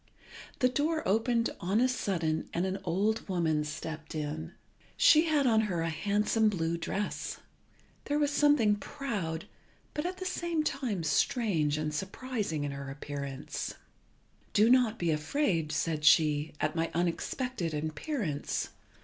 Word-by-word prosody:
The 255 Hz, -, +4 dB
door 310 Hz, +5 st, 0 dB
opened 230 Hz, +3 st, +2 dB
on 195 Hz, +4 st, +1 dB
a 255 Hz, -, +4 dB
sudden, 175 Hz, -10 st, -1 dB
and 175 Hz, +2 st, +1 dB
an 190 Hz, +1 st, -2 dB
old 200 Hz, +5 st, 0 dB
woman 160 Hz, -4 st, +1 dB
stepped 155 Hz, +1 st, -6 dB
in. 155 Hz, +2 st, -4 dB, 0.4 s
She 310 Hz, +1 st, +6 dB
had 305 Hz, -4 st, +2 dB
on 225 Hz, -3 st, +4 dB
her 175 Hz, -3 st, -1 dB
a 165 Hz, -, -1 dB
handsome 210 Hz, +6 st, +2 dB
blue 165 Hz, -4 st, -1 dB
dress. 195 Hz, +5 st, -3 dB, 0.7 s
There 290 Hz, -, 0 dB
was 295 Hz, -1 st, +2 dB
something 285 Hz, -8 st, +4 dB
proud, 205 Hz, -, -4 dB, 0.5 s
but 300 Hz, +3 st, -1 dB
at 365 Hz, +1 st, -5 dB
the 370 Hz, -, -5 dB
same 345 Hz, -3 st, -1 dB
time 235 Hz, -, -2 dB
strange 160 Hz, -, +1 dB
and 155 Hz, 0 st, -2 dB
surprising 195 Hz, -, -3 dB
in 145 Hz, -, -2 dB
her 140 Hz, 0 st, -6 dB
appearance. 140 Hz, -1 st, -5 dB, 0.8 s
"Do 215 Hz, +3 st, +5 dB
not 245 Hz, -3 st, +4 dB
be 170 Hz, -2 st, +1 dB
afraid," 160 Hz, -, 0 dB
said 150 Hz, 0 st, -1 dB
she, 150 Hz, -1 st, +4 dB
"at 155 Hz, +1 st, 0 dB
my 165 Hz, 0 st, 0 dB
unexpected 175 Hz, -, -1 dB
appearance. 155 Hz, -, -2 dB
190 Hz, 140 wpm, -30 LUFS, 155-250 Hz, 0.8 s, She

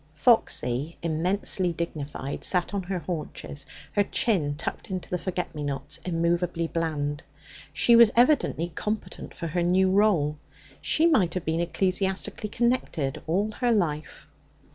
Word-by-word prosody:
Foxy, 150 Hz, -, +2 dB
immensely 175 Hz, +3 st, 0 dB
dignified, 145 Hz, -4 st, -5 dB
sat 180 Hz, +1 st, +1 dB
on 200 Hz, -, 0 dB
her 185 Hz, +1 st, -3 dB
haunches, 150 Hz, -3 st, -6 dB, 0.2 s
her 205 Hz, -, +2 dB
chin 180 Hz, -10 st, +1 dB
tucked 160 Hz, -, -5 dB
into 185 Hz, -2 st, -4 dB
the 180 Hz, -, +1 dB
forget 180 Hz, -1 st, -3 dB
me 150 Hz, -, -6 dB
nots, 140 Hz, -2 st, -4 dB
immovably 170 Hz, 0 st, 0 dB
bland. 150 Hz, -3 st, -2 dB, 0.5 s
She 235 Hz, -, +5 dB
was 230 Hz, -1 st, +8 dB
evidently 240 Hz, -, +3 dB
competent 210 Hz, +6 st, -5 dB
for 170 Hz, -, -5 dB
her 170 Hz, +2 st, -1 dB
new 185 Hz, +2 st, +3 dB
role; 180 Hz, -8 st, +2 dB, 0.4 s
she 320 Hz, -, +3 dB
might 210 Hz, -, +3 dB
have 180 Hz, -, -3 dB
been 160 Hz, +1 st, 0 dB
ecclesiastically 190 Hz, +3 st, -1 dB
connected 235 Hz, -, 0 dB
all 200 Hz, +6 st, +1 dB
her 245 Hz, +2 st, 0 dB
life. 160 Hz, -8 st, -1 dB
175 Hz, 140 wpm, -26 LUFS, 155-200 Hz, 0.5 s, was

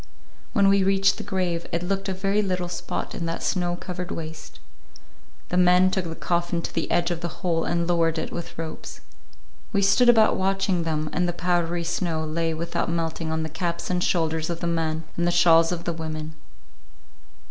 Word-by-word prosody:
When 200 Hz, -4 st, +4 dB
we 195 Hz, 0 st, +4 dB
reached 195 Hz, 0 st, +3 dB
the -, -, -5 dB
grave, 180 Hz, -4 st, -2 dB
it 170 Hz, +1 st, -1 dB
looked 195 Hz, +2 st, -2 dB
a -, -, 0 dB
very 195 Hz, +2 st, +1 dB
little 180 Hz, -3 st, -2 dB
spot 175 Hz, -, -4 dB
in 170 Hz, -, -3 dB
that 165 Hz, -, -3 dB
snow 175 Hz, -2 st, 0 dB
covered 180 Hz, 0 st, -6 dB
waste. 155 Hz, -1 st, -7 dB, 0.9 s
The 180 Hz, -, 0 dB
men 180 Hz, +1 st, +5 dB
took 190 Hz, -1 st, -1 dB
the 165 Hz, -1 st, -5 dB
coffin 175 Hz, 0 st, -1 dB
to -, -, -5 dB
the 165 Hz, -, -2 dB
edge 175 Hz, 0 st, +1 dB
of 170 Hz, -1 st, -3 dB
the 170 Hz, -, -1 dB, 0.2 s
hole 165 Hz, -2 st, +1 dB
and 170 Hz, 0 st, 0 dB
lowered 165 Hz, -1 st, +2 dB
it -, -, -3 dB
with 170 Hz, -, -6 dB
ropes. 160 Hz, -1 st, -7 dB, 0.7 s
We 200 Hz, -, +1 dB
stood 200 Hz, +6 st, +5 dB
about 225 Hz, -2 st, +5 dB
watching 190 Hz, -2 st, 0 dB
them, 155 Hz, -1 st, -1 dB
and 180 Hz, 0 st, +1 dB
the 175 Hz, -, -1 dB
powdery 175 Hz, 0 st, 0 dB
snow 165 Hz, -1 st, -1 dB
lay 165 Hz, +1 st, -1 dB
without 165 Hz, +1 st, -2 dB
melting 165 Hz, -1 st, -2 dB
on 160 Hz, 0 st, -1 dB
the -, -, -2 dB
caps 170 Hz, +2 st, -3 dB
and 180 Hz, -1 st, +1 dB
shoulders 160 Hz, -2 st, 0 dB
of 170 Hz, -1 st, -3 dB
the -, -, -3 dB
men 165 Hz, -1 st, -1 dB
and 170 Hz, 0 st, +1 dB
the -, -, +3 dB
shawls 165 Hz, -1 st, +5 dB
of 170 Hz, -1 st, -3 dB
the 170 Hz, -, -2 dB
women. 155 Hz, -1 st, -5 dB
170 Hz, 200 wpm, -25 LUFS, 165-180 Hz, 0.9 s, men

